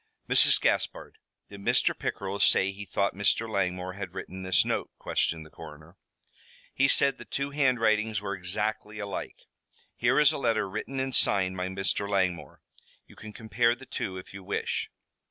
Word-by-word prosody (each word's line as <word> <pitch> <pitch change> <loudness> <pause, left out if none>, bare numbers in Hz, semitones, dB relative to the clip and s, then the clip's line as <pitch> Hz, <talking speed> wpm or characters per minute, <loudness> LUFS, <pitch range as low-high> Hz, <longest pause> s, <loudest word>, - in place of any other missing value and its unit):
"Mrs. - - +6
Gaspard, - - -1 0.3
did 100 -1 -11
Mr. - - +2
Pickerell 100 +1 -4
say 95 0 +4
he 100 +1 -8
thought 100 +2 0
Mr. 100 +3 +1
Langmore 90 -3 -2
had 95 -2 -7
written 95 0 -7
this 95 -2 +2
note?" - - -1
questioned 80 -1 -1
the 75 - -16
coroner. 80 +1 -12 0.8
"He 135 - +3
said 140 0 +3
the - - -8
two 140 0 -3
handwritings 115 -6 +2
were 100 -1 -4
exactly 105 +3 -3
alike. 100 -2 -6 0.5
Here 120 +4 +2
is 150 - +6
a - - -3
letter 115 -6 +1
written 110 +7 -5
and 130 0 -2
signed 95 -5 +3
by 90 0 -2
Mr. 95 +2 -2
Langmore. 95 -3 -1 0.4
You - - -18
can 110 - -10
compare 115 +2 +1
the 130 +2 -13
two, 95 -6 -4
if 90 - -10
you 100 -1 -9
wish." - - -2
100 Hz, 170 wpm, -28 LUFS, 95-115 Hz, 0.8 s, Mrs